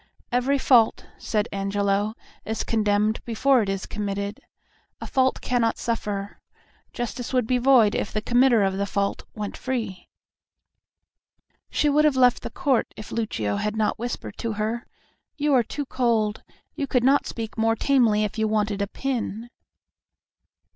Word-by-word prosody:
"Every 250 Hz, +3 st, +2 dB
fault," 245 Hz, -4 st, +4 dB
said 210 Hz, -2 st, -1 dB
Angelo, 200 Hz, +1 st, 0 dB, 0.3 s
"is 220 Hz, 0 st, -3 dB
condemned 210 Hz, 0 st, +1 dB
before 245 Hz, +3 st, +3 dB
it 200 Hz, -, -2 dB
is 195 Hz, -1 st, -2 dB
committed. 200 Hz, 0 st, -4 dB, 0.6 s
A -, -, -6 dB
fault 260 Hz, -1 st, +1 dB
cannot 235 Hz, -2 st, +1 dB
suffer. 205 Hz, -3 st, -3 dB, 0.5 s
Justice 240 Hz, +1 st, -5 dB
would 250 Hz, -3 st, +2 dB
be 250 Hz, +2 st, +1 dB
void 245 Hz, -5 st, +5 dB
if -, -, -2 dB
the 215 Hz, -, -1 dB
committer 240 Hz, 0 st, +4 dB
of 195 Hz, 0 st, 0 dB
a 200 Hz, -, 0 dB
fault 200 Hz, +1 st, -2 dB
went 210 Hz, -2 st, -4 dB
free." 225 Hz, -8 st, -4 dB, 1.6 s
She 300 Hz, -, +1 dB
would 295 Hz, +1 st, +4 dB
have 290 Hz, -3 st, +3 dB
left 250 Hz, -1 st, +4 dB
the -, -, -5 dB
court 265 Hz, -5 st, 0 dB
if 215 Hz, -, -9 dB
Lucio 110 Hz, -, -2 dB
had 210 Hz, 0 st, -2 dB
not 215 Hz, -1 st, 0 dB
whispered 240 Hz, +1 st, -5 dB
to 230 Hz, -2 st, -2 dB
her, 220 Hz, +3 st, -3 dB, 0.5 s
"You 295 Hz, 0 st, +1 dB
are 255 Hz, -, +6 dB
too 285 Hz, +5 st, -5 dB
cold; 230 Hz, -5 st, 0 dB, 0.3 s
you 280 Hz, -, -3 dB
could 250 Hz, -3 st, +1 dB
not 275 Hz, +2 st, +3 dB
speak 225 Hz, -2 st, -5 dB
more 225 Hz, 0 st, +2 dB
tamely 230 Hz, -5 st, +3 dB
if 215 Hz, +1 st, -3 dB
you 220 Hz, -, +2 dB
wanted 210 Hz, -1 st, 0 dB
a 200 Hz, -, 0 dB
pin." 240 Hz, -2 st, -4 dB
225 Hz, 155 wpm, -24 LUFS, 210-250 Hz, 1.6 s, are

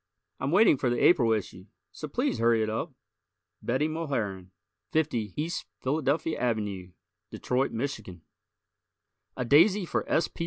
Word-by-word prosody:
I'm 135 Hz, -, -2 dB
waiting 185 Hz, -2 st, +5 dB
for 125 Hz, -, 0 dB
the 120 Hz, -, 0 dB
April 130 Hz, -10 st, +4 dB
issue, 95 Hz, -3 st, -3 dB, 0.3 s
so 155 Hz, -, -7 dB
please 250 Hz, -, -1 dB
hurry 115 Hz, -1 st, +3 dB
it 110 Hz, -, -2 dB
up. 110 Hz, -, -3 dB, 0.7 s
Betty 130 Hz, +6 st, 0 dB
Mulharen, 120 Hz, -, -3 dB, 0.5 s
50 120 Hz, -10 st, 0 dB
E. 155 Hz, +3 st, -2 dB, 0.3 s
Philadelphia 150 Hz, +3 st, 0 dB
Ave, 105 Hz, -6 st, -2 dB, 0.4 s
Detroit, 130 Hz, +2 st, -1 dB
Mich. 125 Hz, +1 st, -3 dB, 1.4 s
_A 125 Hz, -2 st, -2 dB
Daisy 180 Hz, -, +5 dB
for -, -, -1 dB
S. 155 Hz, +1 st, +2 dB
P. -, -, -19 dB
130 Hz, 140 wpm, -28 LUFS, 110-155 Hz, 1.4 s, waiting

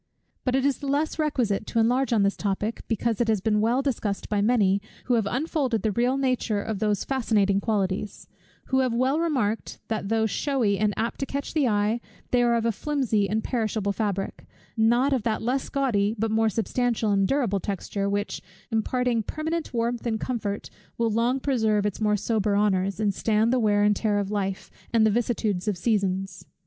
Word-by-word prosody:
But 255 Hz, -1 st, +1 dB
it 265 Hz, 0 st, +1 dB
is 280 Hz, -2 st, +1 dB
the 285 Hz, -, -5 dB
less 295 Hz, +3 st, 0 dB
requisite 245 Hz, -10 st, 0 dB
to 230 Hz, -, 0 dB
enlarge 250 Hz, +4 st, +2 dB
on 220 Hz, -4 st, +3 dB
this 200 Hz, 0 st, +2 dB
topic, 205 Hz, +2 st, -2 dB
because 230 Hz, 0 st, 0 dB
it 235 Hz, -, +1 dB
has 220 Hz, -2 st, +2 dB
been 210 Hz, +2 st, +1 dB
well 240 Hz, +5 st, +2 dB
discussed 220 Hz, -7 st, -2 dB
by 205 Hz, -1 st, +1 dB
many, 200 Hz, -3 st, +3 dB, 0.2 s
who 250 Hz, -, +1 dB
have 225 Hz, -4 st, +2 dB
unfolded 265 Hz, -, -1 dB
the 220 Hz, -, +1 dB
real 245 Hz, +5 st, +1 dB
nature 255 Hz, -6 st, 0 dB
of 210 Hz, -1 st, -3 dB
those 210 Hz, -2 st, 0 dB
fascinating 210 Hz, -7 st, +1 dB
qualities; 200 Hz, -1 st, -2 dB, 0.4 s
who 265 Hz, -, +1 dB
have 255 Hz, -3 st, +1 dB
well 260 Hz, +5 st, +2 dB
remarked, 255 Hz, -10 st, -1 dB
that 215 Hz, -3 st, -2 dB
though 225 Hz, 0 st, +2 dB
shewy 225 Hz, -3 st, 0 dB
and 210 Hz, -1 st, +1 dB
apt 230 Hz, +1 st, -2 dB
to 275 Hz, -, -2 dB
catch 280 Hz, 0 st, -4 dB
the 295 Hz, -5 st, +2 dB
eye, 210 Hz, +2 st, +1 dB, 0.3 s
they 245 Hz, -, +4 dB
are 240 Hz, -1 st, +3 dB
of 230 Hz, -1 st, 0 dB
a 230 Hz, -, +3 dB
flimsy 230 Hz, -5 st, 0 dB
and 215 Hz, +2 st, 0 dB
perishable 220 Hz, -4 st, -1 dB
fabric, 200 Hz, -2 st, -3 dB, 0.3 s
not 240 Hz, +5 st, +3 dB
of 260 Hz, -, +1 dB
that 220 Hz, 0 st, -1 dB
less 255 Hz, +3 st, -1 dB
gaudy 225 Hz, -7 st, +1 dB
but 220 Hz, +1 st, -1 dB
more 220 Hz, 0 st, +3 dB
substantial 230 Hz, 0 st, 0 dB
and 195 Hz, -1 st, +3 dB
durable 235 Hz, -7 st, +1 dB
texture, 200 Hz, +1 st, -3 dB
which, 205 Hz, 0 st, -2 dB, 0.3 s
imparting 235 Hz, +1 st, +1 dB
permanent 315 Hz, +7 st, -3 dB
warmth 235 Hz, 0 st, -1 dB
and 220 Hz, -1 st, -1 dB
comfort, 215 Hz, -5 st, -3 dB, 0.3 s
will 230 Hz, -1 st, +1 dB
long 235 Hz, +4 st, +1 dB
preserve 220 Hz, -7 st, +1 dB
its 210 Hz, +1 st, -2 dB
more 210 Hz, -1 st, +2 dB
sober 210 Hz, -1 st, 0 dB
honours, 195 Hz, -1 st, +1 dB
and 210 Hz, -2 st, +1 dB
stand 220 Hz, +4 st, +1 dB
the 255 Hz, -, +3 dB
wear 205 Hz, -2 st, +3 dB
and 210 Hz, 0 st, +4 dB
tear 210 Hz, -2 st, +1 dB
of 200 Hz, 0 st, -2 dB
life, 195 Hz, -2 st, -3 dB, 0.2 s
and 225 Hz, -2 st, +4 dB
the 215 Hz, -, +4 dB
vicissitudes 220 Hz, -4 st, -1 dB
of 205 Hz, -3 st, 0 dB
seasons. 195 Hz, -2 st, -1 dB
220 Hz, 195 wpm, -25 LUFS, 205-250 Hz, 0.4 s, they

